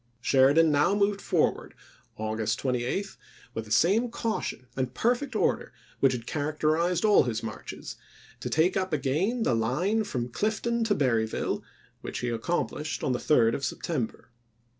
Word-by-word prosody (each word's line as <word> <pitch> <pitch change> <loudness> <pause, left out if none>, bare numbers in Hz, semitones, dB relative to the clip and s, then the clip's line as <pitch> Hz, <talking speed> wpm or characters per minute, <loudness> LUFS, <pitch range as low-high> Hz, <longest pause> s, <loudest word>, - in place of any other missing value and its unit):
Sheridan 140 +5 +4
now 150 +7 +3
moved 200 0 +1
forward - - 0 0.2
— - - -36
August 110 0 -1
28 130 +10 -2 0.2
— - - -24
with 115 - -4
the 105 - -13
same 200 - +3
caution 225 - -3
and 130 -1 -2
perfect 250 +2 0
order - - 0 0.3
which 135 -1 +4
had 120 -2 -5
characterized 155 +5 0
all 210 -1 +6
his 115 -2 -2
marches, 110 -1 -7 0.4
to - - -4
take 160 +4 +2
up 185 -3 -1
again 160 - 0
the 130 - +2
line 150 - +1
from 125 - -3
Clifton 220 - -1
to 210 -2 +2
Berryville, 115 -5 0 0.4
which - - -5
he 120 - -1
accom 120 +10 0
plished 150 +1 -5
on - - +1
the 125 - 0
3d 115 -6 +3
of 140 - -3
September. 130 -4 -3
150 Hz, 160 wpm, -28 LUFS, 125-200 Hz, 0.4 s, all